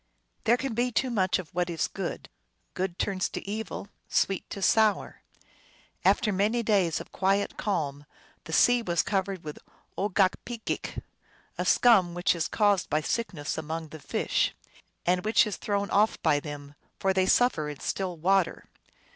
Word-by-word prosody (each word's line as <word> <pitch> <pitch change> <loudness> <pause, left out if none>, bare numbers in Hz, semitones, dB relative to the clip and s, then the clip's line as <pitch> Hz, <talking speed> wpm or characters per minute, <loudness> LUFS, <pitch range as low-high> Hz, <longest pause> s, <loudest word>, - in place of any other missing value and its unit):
There 235 +2 +4
can 265 -1 -3
be 245 +2 0
too 255 +3 0
much 190 -5 +2
of 180 -5 -9
what 175 0 0
is 165 -2 -1
good; - - -5 0.5
good 185 -1 -3
turns 190 -2 -1
to - - -7
evil, 215 -1 -4 0.2
sweet 195 -2 0
to - - -6
sour. 215 +2 +2 0.8
After 215 -4 +3
many 215 +5 +1
days 195 -7 +2
of - - -10
quiet 195 +1 +1
calm 145 -8 -2 0.4
the - - -8
sea 245 +8 +5
was 175 -6 0
covered 195 -2 -2
with 150 -1 -7 0.4
Ogokpegeak, 205 +4 -1 0.5
a - - -2
scum 195 -9 +5
which 175 +1 +2
is 165 -2 -1
caused 205 -4 +2
by 155 +1 +1
sickness 175 -5 -3
amojjg 160 0 -5
the 155 - -9
fish, - - 0 0.5
and 180 +1 +2
which 215 +2 +4
is 210 - -4
thrown 200 -1 -2
off 210 +2 +3
by 145 - +3
them, 145 -1 -8 0.3
for 190 0 +2
they 190 0 +2
suffer 180 -13 +3
in 145 - -7
still 185 -3 -3
water. 185 +2 +1
190 Hz, 160 wpm, -28 LUFS, 170-215 Hz, 0.8 s, sea